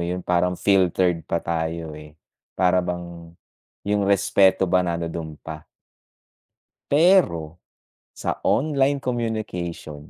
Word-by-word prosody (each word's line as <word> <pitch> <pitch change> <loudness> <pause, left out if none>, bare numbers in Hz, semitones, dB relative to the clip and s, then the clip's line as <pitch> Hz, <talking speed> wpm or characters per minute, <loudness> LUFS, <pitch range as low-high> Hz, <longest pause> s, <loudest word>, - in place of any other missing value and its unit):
yun, 90 +1 -4
parang 90 0 +1
filtered 90 -3 +2
pa 85 - 0
tayo, 80 -1 -3
eh, 75 0 -12 0.4
para 90 0 +3
bang 85 -1 -6 0.5
yung 105 0 +1
respeto 95 -1 +3
ba, 90 0 +2
nanduduon 85 -3 -4
pa. 80 -1 -8 1.2
Pero 140 - +3 0.6
sa - - -3
online 140 0 +2
communication 110 - -4
90 Hz, 100 wpm, -23 LUFS, 85-100 Hz, 1.2 s, para